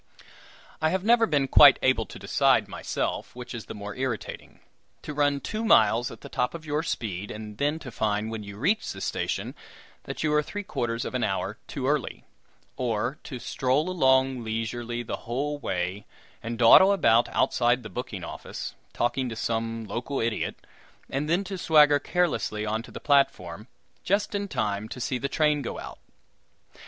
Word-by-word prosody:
I 155 Hz, -, +3 dB
never 225 Hz, +4 st, +4 dB
have -, -, -9 dB
been 140 Hz, -3 st, +2 dB
quite -, -, +8 dB
able -, -, +2 dB
to -, -, -10 dB
decide, -, -, +2 dB
myself, -, -, -3 dB
which 125 Hz, 0 st, -8 dB
is 115 Hz, -2 st, -6 dB
the -, -, -7 dB
more 100 Hz, -1 st, -7 dB
irritating 130 Hz, -4 st, -5 dB, 0.4 s
to 150 Hz, -, -5 dB
run 145 Hz, -1 st, +2 dB
two 215 Hz, +9 st, -4 dB
miles 115 Hz, -, +4 dB
at -, -, -11 dB
the -, -, -9 dB
top 125 Hz, +6 st, -1 dB
of 160 Hz, -2 st, -8 dB
your 150 Hz, 0 st, 0 dB
speed, 105 Hz, -, -3 dB
and 105 Hz, -1 st, -8 dB
then 145 Hz, +2 st, +1 dB
to 140 Hz, -6 st, -9 dB
find, 105 Hz, 0 st, -1 dB
when 110 Hz, -1 st, -4 dB
you 100 Hz, -1 st, -9 dB
reach 195 Hz, -, +1 dB
the -, -, -9 dB
station, -, -, -2 dB, 0.5 s
that -, -, -5 dB
you 155 Hz, -1 st, +1 dB
are 150 Hz, -, +4 dB
three 205 Hz, +7 st, -6 dB
quarters 120 Hz, -, -2 dB
of -, -, -5 dB
an 125 Hz, -2 st, 0 dB
hour 95 Hz, +2 st, -2 dB
too 135 Hz, -3 st, -3 dB
early; 145 Hz, -3 st, -1 dB, 0.5 s
or 120 Hz, +3 st, -1 dB
to 130 Hz, -, -6 dB
stroll 135 Hz, +7 st, 0 dB
along 130 Hz, -6 st, +3 dB
leisurely 115 Hz, +2 st, -3 dB
the -, -, -4 dB
whole 145 Hz, +5 st, -2 dB
way, 90 Hz, -2 st, -3 dB, 0.3 s
and 115 Hz, 0 st, -4 dB
dawdle 125 Hz, +12 st, +8 dB
about 120 Hz, -, +4 dB
outside 120 Hz, 0 st, +2 dB
the -, -, -6 dB
booking 120 Hz, -6 st, -6 dB
office, -, -, -6 dB, 0.2 s
talking 125 Hz, +2 st, 0 dB
to 115 Hz, -, -5 dB
some 115 Hz, 0 st, -2 dB
local 120 Hz, +6 st, -3 dB
idiot, 115 Hz, -1 st, -1 dB, 0.6 s
and 145 Hz, +3 st, -2 dB
then 175 Hz, +4 st, +2 dB
to 195 Hz, -1 st, -6 dB
swagger 150 Hz, -3 st, +5 dB
carelessly 150 Hz, -11 st, 0 dB
on 110 Hz, +1 st, -1 dB
to 115 Hz, -, -13 dB
the -, -, -8 dB
platform, 105 Hz, -, +1 dB, 0.4 s
just 200 Hz, +5 st, +1 dB
in 200 Hz, 0 st, -2 dB
time 110 Hz, -, -2 dB
to 125 Hz, -, -7 dB
see 125 Hz, +1 st, -2 dB
the 140 Hz, -, -2 dB
train 150 Hz, -1 st, +2 dB
go 125 Hz, -, -5 dB
out! -, -, -8 dB
125 Hz, 180 wpm, -26 LUFS, 110-150 Hz, 0.6 s, quite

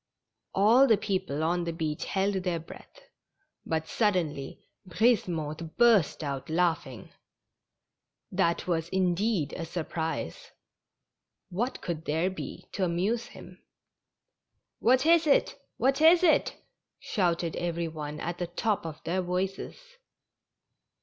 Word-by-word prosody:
All 230 Hz, +8 st, +6 dB
the 220 Hz, -4 st, +5 dB
people 185 Hz, -8 st, -2 dB
on 175 Hz, +2 st, +1 dB
the 170 Hz, -, -2 dB
beach 155 Hz, -2 st, -3 dB
held 195 Hz, +1 st, 0 dB
their 180 Hz, -2 st, -1 dB
breath, 165 Hz, -, -12 dB, 0.7 s
but 160 Hz, 0 st, -1 dB
suddenly 170 Hz, -, -1 dB, 0.2 s
Brisemotte 170 Hz, -6 st, 0 dB
burst 220 Hz, -10 st, +4 dB
out 140 Hz, -1 st, -4 dB
laughing. 160 Hz, -, -1 dB, 1.2 s
That 170 Hz, 0 st, +1 dB
Avas, 170 Hz, -2 st, -1 dB
indeed, 190 Hz, -1 st, 0 dB
a 170 Hz, -, -4 dB
surprise; 160 Hz, -, -4 dB, 1.0 s
what 235 Hz, +9 st, -2 dB
could 165 Hz, -3 st, -4 dB
there 160 Hz, +5 st, 0 dB
be 185 Hz, -, -8 dB
to 195 Hz, -, -2 dB
amuse 190 Hz, +7 st, 0 dB
him? -, -, -13 dB, 0.6 s
" -, -, -59 dB, 0.3 s
What 255 Hz, +4 st, +3 dB
is 330 Hz, -1 st, +5 dB
it? 280 Hz, -, +2 dB, 0.2 s
what 270 Hz, +3 st, +1 dB
is 335 Hz, +3 st, +7 dB
it? 325 Hz, -4 st, +3 dB, 0.2 s
" -, -, -59 dB
shouted 170 Hz, -4 st, +1 dB
every 170 Hz, -1 st, -2 dB
one 150 Hz, -2 st, -6 dB
at 175 Hz, +1 st, -4 dB
the 175 Hz, -, -2 dB
top 195 Hz, +1 st, -1 dB
of 155 Hz, -1 st, -9 dB
their 185 Hz, +3 st, -1 dB
voices. 185 Hz, +2 st, -3 dB
175 Hz, 125 wpm, -28 LUFS, 160-205 Hz, 1.2 s, is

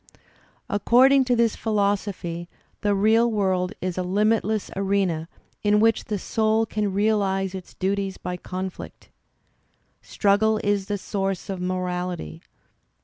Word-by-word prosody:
According 255 Hz, +6 st, +4 dB
to 250 Hz, -1 st, +2 dB
this 230 Hz, -2 st, +2 dB
philosophy 200 Hz, -5 st, -1 dB, 0.3 s
the 205 Hz, -1 st, +2 dB
real 220 Hz, +4 st, +4 dB
world 190 Hz, -4 st, 0 dB
is 185 Hz, 0 st, -2 dB
a -, -, +1 dB
limitless 210 Hz, +3 st, 0 dB
] -, -, -14 dB
arena 190 Hz, -5 st, 0 dB, 0.3 s
in 210 Hz, 0 st, +3 dB
which 225 Hz, 0 st, +3 dB
the 210 Hz, -, -2 dB
soul 220 Hz, +3 st, +1 dB
can 210 Hz, -2 st, -2 dB
realize 195 Hz, -2 st, +1 dB
its 190 Hz, -2 st, -9 dB
duties 195 Hz, 0 st, -1 dB
by 180 Hz, 0 st, -4 dB
conflict. 185 Hz, +1 st, -7 dB, 0.9 s
Struggle 215 Hz, +2 st, +2 dB
is 205 Hz, -1 st, 0 dB
the 205 Hz, -, -1 dB
source 195 Hz, -1 st, -3 dB
of 185 Hz, -2 st, -5 dB
morality. 180 Hz, -, -3 dB
200 Hz, 130 wpm, -24 LUFS, 185-215 Hz, 0.9 s, According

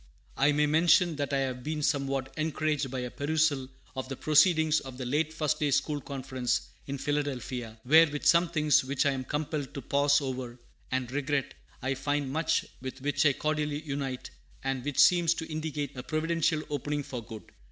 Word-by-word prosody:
I 140 Hz, +2 st, +4 dB
may 150 Hz, +1 st, +3 dB
mention 165 Hz, +2 st, +4 dB
that 145 Hz, -1 st, -2 dB
I 140 Hz, -1 st, +1 dB
have 130 Hz, -2 st, -3 dB
been 155 Hz, +1 st, -3 dB
somewhat 135 Hz, -2 st, 0 dB
encouraged 155 Hz, -3 st, -1 dB
by 130 Hz, 0 st, -3 dB
a 125 Hz, -1 st, -5 dB
perusal 145 Hz, -3 st, 0 dB, 0.3 s
of 130 Hz, 0 st, -4 dB
the 135 Hz, -, -3 dB
Proceedings 160 Hz, +1 st, +4 dB
of 130 Hz, -2 st, -9 dB
the 130 Hz, -, -5 dB
late 150 Hz, +5 st, 0 dB
First 155 Hz, -2 st, -1 dB
day 150 Hz, -, +1 dB
School 145 Hz, +1 st, 0 dB
Conference 130 Hz, -3 st, -2 dB, 0.2 s
in 140 Hz, 0 st, -3 dB
Philadelphia, 130 Hz, -6 st, -3 dB
where, 160 Hz, +5 st, +7 dB
with 145 Hz, 0 st, -5 dB
some 170 Hz, 0 st, +5 dB
things 150 Hz, -4 st, +3 dB
which 140 Hz, +3 st, 0 dB
I 140 Hz, -, +4 dB
am 130 Hz, -1 st, -3 dB
compelled 145 Hz, 0 st, -3 dB
to 140 Hz, -, -4 dB
pause 145 Hz, +2 st, +3 dB
over, 130 Hz, -3 st, -5 dB, 0.3 s
and 130 Hz, -1 st, -2 dB
regret, 145 Hz, 0 st, -1 dB, 0.3 s
I 130 Hz, +1 st, 0 dB
find 140 Hz, 0 st, -1 dB
much 160 Hz, +2 st, +1 dB, 0.2 s
with 130 Hz, +1 st, -6 dB
which 145 Hz, +2 st, +2 dB
I 140 Hz, -, +4 dB
cordially 150 Hz, 0 st, -2 dB
unite, 140 Hz, -3 st, -4 dB, 0.3 s
and 135 Hz, -2 st, -2 dB
which 145 Hz, -1 st, -4 dB
seems 175 Hz, -2 st, +5 dB
to 160 Hz, -, -5 dB
indicate 155 Hz, -3 st, -3 dB
a 125 Hz, -, -5 dB
providential 155 Hz, +1 st, 0 dB
opening 145 Hz, +1 st, -2 dB
for 125 Hz, -3 st, -6 dB
good. 110 Hz, -1 st, -9 dB
145 Hz, 185 wpm, -29 LUFS, 130-155 Hz, 0.3 s, where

